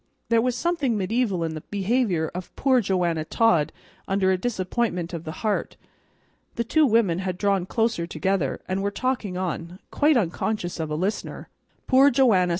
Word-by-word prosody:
There 230 -1 +4
was 250 0 0
something 280 -5 0
mediaeval 200 -2 0
in 160 -1 -2
the 155 - -6
behavior 200 -4 0
of 180 0 -7
poor 260 -2 +3
Joanna 175 -5 0
Todd 170 -4 +2 0.4
under 190 -1 +2
a - - +3
disappointment 185 -4 -2
of 165 -1 -5
the 155 - -4
heart. 210 -2 -1 0.8
The 235 - 0
two 305 +6 +3
women 215 -7 +2
had 185 -1 -3
drawn 195 -2 +1
closer 225 -7 0
together, 170 -3 -1
and 185 +1 -1
were 200 - 0
talking 215 -4 -2
on, 175 -1 -4
quite 295 -1 +3
unconscious 180 -2 -2
of 160 -1 -2
a 150 - -2
listener. 190 +7 -3 0.4
"Poor 270 +2 +6
Joanna!" 230 -9 +3
195 Hz, 165 wpm, -24 LUFS, 175-235 Hz, 0.8 s, Poor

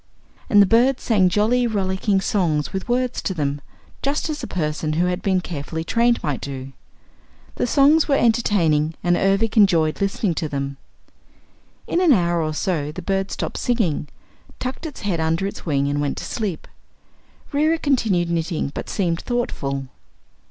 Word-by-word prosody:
And 205 -2 +7
the - - +4
bird 245 +6 +3
sang 195 -6 +3
jolly, 225 +6 +2
rollicking 195 -1 0
songs 165 -8 0
with 190 +4 -4
words 250 0 0
to 190 - -3
them 145 -2 -2 0.4
just 290 +3 -1
as 300 - -5
a - - -5
person 155 -2 -2
who 170 +3 +2
had 180 0 -1
been 190 -2 +1
carefully 160 -1 -5
trained 235 +6 +2
might 145 -4 -2
do. 135 -1 -6 0.8
The - - 0
songs 290 +5 +4
were 280 - +3
entertaining 175 - +2
and 175 -1 +3
Ervic 195 +5 +1
enjoyed 170 -7 +4
listening 195 -1 0
to 155 - -2
them. 140 -1 -3 1.1
In 350 - 0
an 340 -6 +6
hour 175 -5 +2
or 155 -1 -2
so 155 -5 -1
the 180 +3 -8
bird 195 +1 -1
stopped - - -4
singing, 215 -12 0 0.5
tucked 260 +6 -4
its 295 - -9
head 195 -5 -1
under 160 +3 0
its 195 - -6
wing 140 -2 +1
and 145 +1 -1
went 145 -1 -2
to - - -5
sleep. 205 -8 -4 0.9
Reera 310 +3 +2
continued 215 - +1
knitting 165 -3 -1
but - - -6
seemed 170 -4 -1
thoughtful. 140 - -2
185 Hz, 165 wpm, -22 LUFS, 155-230 Hz, 1.1 s, And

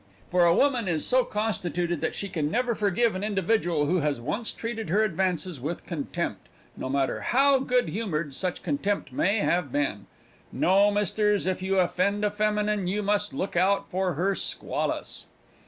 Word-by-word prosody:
For 180 -1 +4
a 170 0 +5
woman 255 -7 +2
is 160 -3 0
so 255 0 +4
constituted 175 -7 -2
that - - -1
she 200 - -4
can 160 -6 -2
never 245 +5 0
forgive 210 +2 +1
an 185 +1 -4
individual 195 -6 +1
who 175 +5 +1
has 145 -4 0
once 210 - -2
treated 225 -4 -5
her 205 +6 +3
advances 180 -4 -1
with 160 +6 -4
contempt, 160 -6 -4 0.3
no - - -5
matter 135 0 0
how 275 +2 +4
good 250 -7 +1
humoured 165 -7 -3
such 180 +6 -3
contempt 175 +1 -1
may 200 +10 +1
have 170 -6 0
been. 140 -8 -1 0.4
No, 195 +3 +4
misters, 210 0 +1
if 185 0 -1
you 190 +1 0
offend 195 +3 +1
a 205 - +1
feminine 210 -2 0
you 205 +3 -1
must 205 +1 +1
look 190 - -4
out 190 +3 +2
for 185 -1 0
her 190 +6 +1
squalls. - - -2
190 Hz, 170 wpm, -26 LUFS, 170-210 Hz, 0.4 s, a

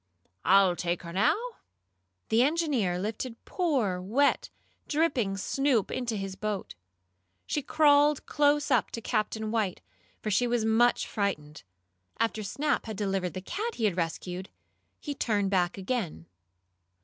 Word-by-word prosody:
"I'll 190 -2 +5
take 175 0 -2
her 170 0 -8
now." 195 +4 +3 0.9
The 225 +2 +4
engineer 275 - +1
lifted 220 +5 -4
poor, 255 - 0
wet, 235 +10 +1 0.4
dripping 275 -11 +1
Snoop 260 +1 +1
into 240 -4 -2
his 195 -1 -4
boat. 210 -1 -4 0.7
She 295 - -1
crawled 290 0 +4
close 290 0 +2
up - - +3
to - - -3
Captain 215 -1 -1
White, 215 -5 0 0.4
for 215 - -3
she 245 +5 +2
was 235 -2 +1
much 230 +2 +3
frightened. 150 -8 -3 0.6
After 225 -1 0
Snap 280 +7 -1
had 220 -3 -5
delivered 195 -3 -1
the 185 - -4
cat 440 - -4
he 225 - 0
had 200 -5 +1
rescued, 180 +2 -3 0.5
he 290 - -4
turned 205 -7 0
back 180 -1 +1
again. 190 - -3
215 Hz, 135 wpm, -28 LUFS, 190-265 Hz, 0.9 s, I'll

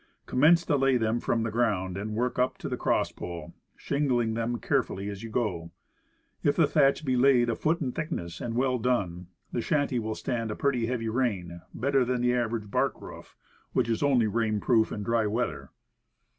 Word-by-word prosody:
Commence 165 +6 +4
to 145 - +2
lay 135 -1 +3
them 115 0 0
from 115 -1 0
the 115 - -2
ground, 105 -6 0
and 105 +2 -4
work 125 +2 -1
up 125 +1 +1
to - - -6
the - - -2
crosspole, 85 -3 -2 0.2
shingling 125 -6 0
them 115 +1 -1
carefully 115 -7 -1
as 100 -1 -7
you 115 - -7
go. 95 -8 -2 0.7
If 145 -3 +2
the 165 - +5
thatch 145 0 +2
be 130 -2 +1
laid 125 -2 +4
a - - -1
foot 165 +2 0
in 130 -4 -1
thickness, 105 - -5
and 115 -1 -3
well 125 0 +1
done, 95 -8 -1 0.2
the 120 - -1
shanty 145 -2 0
will 110 -1 -3
stand 115 -2 -3
a 105 - -3
pretty 125 -5 0
heavy 120 -2 -2
rain 100 -8 -2
better 135 +2 +1
than 125 0 -1
the 125 0 +2
average 115 -4 -2
bark - - 0
roof, - - -11 0.4
which - - +2
is 115 -1 -1
only 135 -5 +3
rain 110 0 0
proof 110 -1 +2
in 105 - -4
dry 115 0 +1
weather. 115 +4 -2
120 Hz, 195 wpm, -28 LUFS, 110-130 Hz, 0.7 s, the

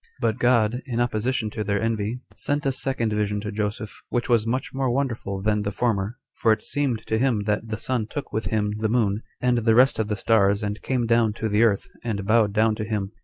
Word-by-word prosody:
3. 115 - +2
But 110 - -4
God, 120 -1 +3
in 120 -2 -2
opposition 120 -1 0
to 110 -1 -3
their 100 0 0
envy, 115 +2 -1
sent 145 0 -1
a 135 - +3
second 130 -4 -1
vision 105 -1 0
to 105 0 -4
Joseph, 105 0 -4
which 120 -2 -1
was 115 -2 +3
much 130 +3 -2
more 135 -1 0
wonderful 115 -7 -2
than 105 0 +2
the 100 0 -2
former; 110 0 -1 0.2
for 110 - +2
it 110 0 +1
seemed 135 -6 -1
to 110 - 0
him 125 -4 +2
that 105 +2 -1
the 110 -1 -3
sun 120 -1 -2
took 145 +5 -6
with 110 -3 -1
him 105 +1 0
the 110 0 0
moon, 110 -3 +1 0.2
and 125 -1 +2
the 115 -1 +3
rest 130 +1 +5
of 110 - 0
the 105 - -1
stars, 100 0 +2
and 105 +1 -3
came 125 -3 0
down 115 -2 +3
to 110 +1 -3
the 105 +1 +2
earth, 110 -4 +2 0.2
and 105 -4 -3
bowed 110 -1 +3
down 110 +1 +3
to 110 - -2
him. 105 -2 -2
110 Hz, 235 wpm, -24 LUFS, 105-120 Hz, 0.2 s, rest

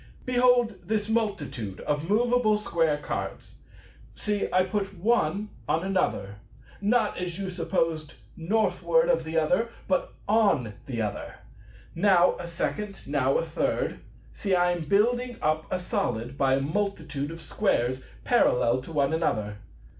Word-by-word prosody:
Behold 245 -3 +3
this 210 -1 -1
multitude 145 - -2
of 150 +3 -2
moveable 235 0 +3
square 165 -7 +1
cards. 100 -9 -5 0.6
See, 210 -1 -1
I 185 0 +4
put 195 0 -3
one 205 0 +1 0.2
on 165 - +1
another, 185 - -1 0.4
not, 215 0 +2
as 180 -1 -4
you 195 -1 -3
supposed, 165 -3 -1 0.2
Northward 225 - +2
of - - +3
the 160 +1 -3
other, 180 +9 +2 0.2
but 275 - 0
on 200 - +3
the 120 -4 -2
other. 105 - -4 0.6
Now 180 0 +4
a 175 - -5
second, 195 +4 -3
now - - +2
a - - 0
third. - - -1 0.3
See, 195 -3 0
I 175 0 +3
am 175 -2 -3
building 240 +7 +2
up 155 +1 0
a 185 - 0
Solid 180 - -2
by 135 -1 +3
a 135 - 0
multitude 155 -3 -2
of 165 0 -8
Squares 130 - 0 0.2
parallel 120 +2 +3
to 135 - -10
one 140 -2 +1
another. 110 -11 -1
180 Hz, 140 wpm, -27 LUFS, 150-210 Hz, 0.6 s, I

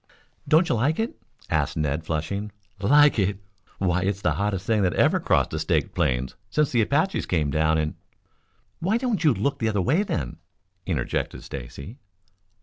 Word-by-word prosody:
"Don't 165 +3 +4
you - - +1
like 130 +8 +1
it?" 225 +1 -2 0.4
asked - - 0
Ned, 75 +1 -1
flushing. 90 +7 -3 0.3
"Like 145 +5 +5
it? 100 0 +1 0.4
Why, 90 -1 +1
it's 100 +1 -2
the - - +3
hottest 100 -2 -1
thing 110 -1 +2
that 90 -3 +1
ever - - +3
crossed - - +1
the - - -2
Staked - - 0
Plains 65 0 0 0.2
since 150 -2 +1
the 120 - +3
Apaches 150 - +1
came 75 -5 0
down 80 +2 +2
in 75 -1 -1 0.5
" - - -43 0.3
"Why 195 +7 +1
don't 235 -8 -1
you 155 - +5
look 135 +6 -1
the 110 - +1
other 105 -2 0
way 140 - +2
then?" 75 - -3 0.5
interjected 75 -10 -2
Stacy. 70 - -8
100 Hz, 175 wpm, -25 LUFS, -, 0.5 s, Like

